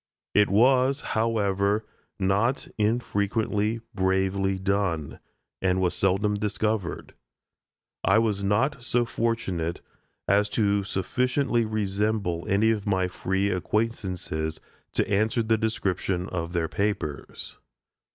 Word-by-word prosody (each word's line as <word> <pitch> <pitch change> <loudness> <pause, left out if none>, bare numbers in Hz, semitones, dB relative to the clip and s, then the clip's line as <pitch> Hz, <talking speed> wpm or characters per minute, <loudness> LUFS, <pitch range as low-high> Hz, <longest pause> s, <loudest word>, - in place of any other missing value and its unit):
It 105 -1 +4
was, 130 +6 +4
however, 105 -2 +1 0.3
not 100 +7 +1
infrequently 110 0 0
bravely 95 +1 +1
done, 95 -6 -1 0.4
and 95 -1 +2
was 90 -2 +1
seldom 95 +2 +1
discovered. 105 -2 -2 0.9
I 95 +4 +4
was 105 -3 +1
not 115 +8 +1
so 120 -1 +1
fortunate 95 -8 -1 0.5
as 105 +1 +3
to 100 -2 +2
sufficiently 120 +5 0
resemble 105 -4 -1
any 105 +3 +4
of 105 -2 -2
my 95 -2 +2
free 95 +2 -1
acquaintances 90 -6 -2 0.3
to - - +1
answer 110 +3 +1
the 110 0 +3
description 95 -4 -1
of 85 -1 -4
their 85 -2 0
papers. 100 -7 -3
100 Hz, 105 wpm, -26 LUFS, 95-110 Hz, 0.9 s, It